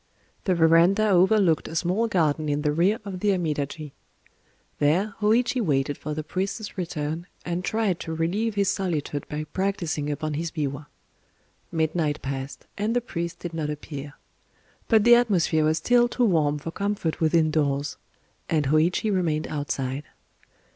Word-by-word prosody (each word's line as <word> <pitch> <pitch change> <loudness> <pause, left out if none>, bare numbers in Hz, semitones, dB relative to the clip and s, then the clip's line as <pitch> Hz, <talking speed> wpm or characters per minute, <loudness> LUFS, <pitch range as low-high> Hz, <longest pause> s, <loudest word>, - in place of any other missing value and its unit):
The 185 - +2
verandah 170 +6 +5
overlooked 190 -2 +4
a 160 - -7
small 185 +7 +1
garden 155 -6 +1
in 145 0 0
the 150 - +2
rear 180 +8 +2
of 190 -2 -5
the 210 - +1
Amidaji. 155 -3 -3 0.9
There 180 +9 +2
Hōïchi 240 +4 +2
waited 145 - +1
for 150 +2 -5
the 155 - -3
priest's 195 +6 -4
return, 165 -2 -3 0.2
and 175 +1 -2
tried 210 -4 0
to 160 - -5
relieve 200 +7 -1
his 200 -1 +2
solitude 155 -6 -2
by 150 +1 -3
practicing 165 -3 -2
upon 150 +1 -2
his 165 +3 -2
biwa. 145 -2 -4 0.8
Midnight 160 -2 0
passed; 135 +1 -5
and 215 +3 0
the - - +4
priest 170 -8 -5
did 175 -1 -5
not 155 -2 -2
appear. 145 -1 -6 0.7
But 220 -3 +4
the 240 +2 +7
atmosphere 185 -10 +3
was 155 +1 +2
still 240 +3 +4
too 245 0 +1
warm 155 -7 +2
for 155 +3 -6
comfort 200 -4 -2
within 160 0 +3
doors; 145 -2 0 0.5
and 155 -3 +1
Hōïchi 170 +7 +2
remained 160 -5 0
outside. 140 -1 -3
165 Hz, 155 wpm, -25 LUFS, 150-195 Hz, 0.9 s, the